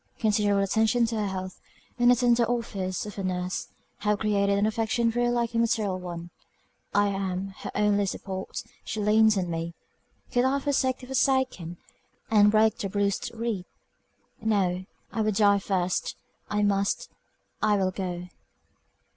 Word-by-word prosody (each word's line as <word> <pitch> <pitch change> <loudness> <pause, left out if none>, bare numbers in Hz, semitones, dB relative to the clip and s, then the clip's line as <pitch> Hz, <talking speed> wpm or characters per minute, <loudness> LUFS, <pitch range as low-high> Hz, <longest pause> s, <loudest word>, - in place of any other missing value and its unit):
Continual 205 -2 +2
attention 220 +4 +2
to 225 0 -2
her 210 -2 0
health, 185 -1 -5 0.4
and 240 0 +5
the 245 - +7
tender 240 -1 +3
office 200 -7 -2
of 210 -1 -7
a - - -2
nurse, 185 0 -2 0.3
have 210 0 +1
created 200 -1 +1
an 205 - +2
affection 225 +2 +1
very 240 +1 +1
like 240 -1 0
a 230 - +1
maternal 215 -5 +1
one 175 -1 -7 0.6
I 205 0 +3
am 195 -1 -2
her - - -6
only 205 -1 +2
support, 190 0 -5 0.2
she 215 - -4
leans 215 0 +4
on 180 -2 -1
me 165 0 -4 0.6
could 245 - +2
I 265 +2 +2
forsake 265 -2 0
the - - -9
forsaken, 260 -10 0 0.5
and 210 -1 +6
break 220 +1 +3
the 195 - -2
bruised 200 +4 0
reed 225 -5 -2 0.8
No 190 -4 +1 0.3
I 225 - -1
would 215 -1 +1
die 200 -1 +5
first! 185 -2 -1 0.3
I 210 0 +1
must 200 - 0 0.5
I 210 -1 +3
will 190 -1 +1
go." 180 -2 -4
205 Hz, 155 wpm, -27 LUFS, 190-230 Hz, 0.8 s, the